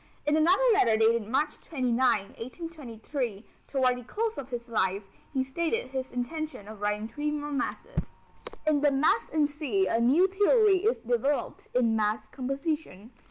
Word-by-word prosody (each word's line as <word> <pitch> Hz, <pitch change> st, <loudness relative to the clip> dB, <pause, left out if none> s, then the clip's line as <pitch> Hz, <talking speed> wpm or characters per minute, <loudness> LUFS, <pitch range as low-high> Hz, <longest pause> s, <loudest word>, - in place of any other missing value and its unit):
In 295 Hz, +1 st, +3 dB
another 345 Hz, +9 st, +4 dB
letter 230 Hz, -, +4 dB
dated 225 Hz, -1 st, +3 dB
March 290 Hz, +6 st, 0 dB
29, 255 Hz, -6 st, -1 dB, 0.4 s
1823, 250 Hz, -, -5 dB, 0.2 s
toward 255 Hz, -2 st, +1 dB
the -, -, -10 dB
close 445 Hz, -, -2 dB
of 270 Hz, -1 st, -7 dB
his 240 Hz, -1 st, -5 dB
life, 200 Hz, -3 st, 0 dB, 0.3 s
he 265 Hz, -2 st, 0 dB
stated 335 Hz, -, -2 dB
his 265 Hz, -1 st, -3 dB
intention 250 Hz, -2 st, -4 dB
of 215 Hz, -1 st, -10 dB
writing 210 Hz, +1 st, -1 dB
three 295 Hz, +6 st, -3 dB
more 295 Hz, 0 st, -3 dB
masses. 295 Hz, -, -3 dB, 0.5 s
In 305 Hz, -2 st, +3 dB
the 295 Hz, -, +5 dB
Mass 305 Hz, +10 st, +2 dB
in 310 Hz, -2 st, +2 dB
C 290 Hz, -10 st, 0 dB
a 225 Hz, -, +1 dB
new 280 Hz, +11 st, +5 dB
theory 410 Hz, +1 st, +4 dB
is 450 Hz, +3 st, +2 dB
developed 245 Hz, +5 st, -1 dB
in 230 Hz, -3 st, +3 dB
mass 215 Hz, 0 st, 0 dB
composition. 275 Hz, -, -4 dB
270 Hz, 160 wpm, -28 LUFS, 230-310 Hz, 0.5 s, the